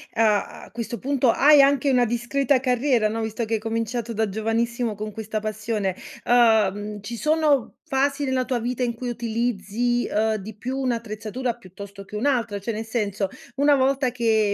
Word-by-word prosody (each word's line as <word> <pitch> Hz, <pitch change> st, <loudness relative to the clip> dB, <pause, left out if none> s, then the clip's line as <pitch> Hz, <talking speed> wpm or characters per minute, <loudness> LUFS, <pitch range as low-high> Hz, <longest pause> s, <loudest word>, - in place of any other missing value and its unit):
a 215 Hz, -2 st, +1 dB
a -, -, -17 dB
questo 235 Hz, 0 st, -5 dB
punto 270 Hz, -2 st, +1 dB
hai 290 Hz, 0 st, +6 dB
anche 275 Hz, 0 st, +3 dB
una 250 Hz, -2 st, +4 dB
discreta 245 Hz, +3 st, +1 dB
carriera, 250 Hz, -2 st, +2 dB
no? 225 Hz, +1 st, -3 dB
Visto 220 Hz, +1 st, -2 dB
che 225 Hz, -, -3 dB
hai 220 Hz, -, +1 dB
cominciato 230 Hz, +1 st, -3 dB
da 220 Hz, -1 st, 0 dB
giovanissimo 225 Hz, +2 st, -1 dB
con 215 Hz, +1 st, -5 dB
questa 220 Hz, 0 st, -4 dB
passione, 215 Hz, -3 st, -2 dB, 0.3 s
uhm, 210 Hz, -3 st, +3 dB
ci 235 Hz, +4 st, -6 dB
sono 300 Hz, -2 st, +1 dB
fasi 280 Hz, +2 st, +1 dB
nella 260 Hz, -2 st, 0 dB
tua 250 Hz, -2 st, -1 dB
vita 245 Hz, +2 st, -2 dB
in 240 Hz, -1 st, 0 dB
cui 245 Hz, +1 st, -5 dB
utilizzi, 235 Hz, 0 st, -1 dB
ehm, 220 Hz, +1 st, +1 dB
di 210 Hz, +1 st, -7 dB
più 255 Hz, +5 st, -4 dB
un'attrezzatura 235 Hz, -1 st, -2 dB
piuttosto 200 Hz, -1 st, -11 dB
che 210 Hz, -, -10 dB
un'altra? 230 Hz, -3 st, 0 dB
Cioè, 215 Hz, +4 st, -3 dB
nel 220 Hz, +1 st, -4 dB
senso, 210 Hz, -4 st, -2 dB, 0.3 s
una 285 Hz, +1 st, +4 dB
volta 265 Hz, -1 st, +2 dB
che 220 Hz, -4 st, +2 dB
230 Hz, 175 wpm, -24 LUFS, 215-255 Hz, 0.3 s, hai